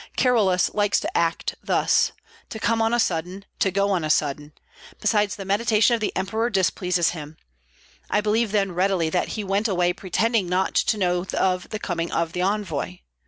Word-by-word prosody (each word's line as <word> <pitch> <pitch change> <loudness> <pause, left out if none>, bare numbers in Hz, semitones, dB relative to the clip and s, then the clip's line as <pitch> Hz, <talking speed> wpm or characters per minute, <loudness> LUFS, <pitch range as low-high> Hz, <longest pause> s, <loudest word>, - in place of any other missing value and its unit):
Carolus 205 -8 +2
likes 205 -1 +2
to - - -5
act 165 -1 0
thus, - - +2 0.4
to - - -6
come 230 0 +1
on 225 0 +2
a 240 - +2
sudden, 180 0 -2
to 195 - +3
go 200 +2 +1
on 180 -4 0
a 155 - -2
sudden; 150 0 0 0.5
besides 210 -1 +1
the 195 - -8
mediation 215 +3 +3
of 230 - 0
the 210 - 0
emperor 220 +5 -1
displeases 180 -3 +1
him. 155 -2 -9 0.7
I - - +2
believe 215 +1 +1
then 200 -2 +1
readily 180 -2 +1
that 180 - 0
he 215 - -2
went 200 +3 0
away 180 -3 +1
pretending 200 +1 0
not 185 +1 0
to 220 - +2
know 180 -2 0
of 185 -1 0
the 215 - -4
coming 170 -4 -3
of 165 0 -1
the 180 - -2
envoy. 180 - -2
190 Hz, 185 wpm, -23 LUFS, 175-210 Hz, 0.7 s, to